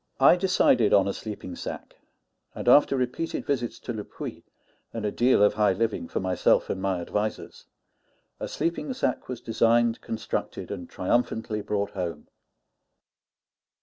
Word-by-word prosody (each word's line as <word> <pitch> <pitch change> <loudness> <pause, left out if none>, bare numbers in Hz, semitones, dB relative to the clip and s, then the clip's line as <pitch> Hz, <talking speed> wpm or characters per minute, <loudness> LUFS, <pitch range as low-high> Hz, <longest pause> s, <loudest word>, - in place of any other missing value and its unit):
I - - +7
decided 175 - +3
on 100 -1 +4
a 100 - -1
sleeping 105 -4 -7
sack; - - -7 0.6
and - - -6
after 140 -2 +6
repeated 130 +6 -2
visits 125 -5 -1
to 120 - -4
Le 105 -2 -5
Puy, - - -8 0.5
and 115 -2 -4
a 105 - 0
deal 120 -3 +4
of 105 - +5
high 105 -2 +3
living 110 -3 -1
for - - -2
myself 95 -1 +2
and 95 - -3
my 95 -2 0
advisers, 105 +5 -4 0.7
a - - -3
sleeping 170 +10 -2
sack 260 - -2
was 125 -2 -5
designed, 115 +1 +2
constructed, 110 -1 -4
and 90 -4 -6
triumphantly 110 +1 -1
brought 100 0 -2
home. 85 -5 -5
110 Hz, 150 wpm, -26 LUFS, 100-120 Hz, 0.7 s, I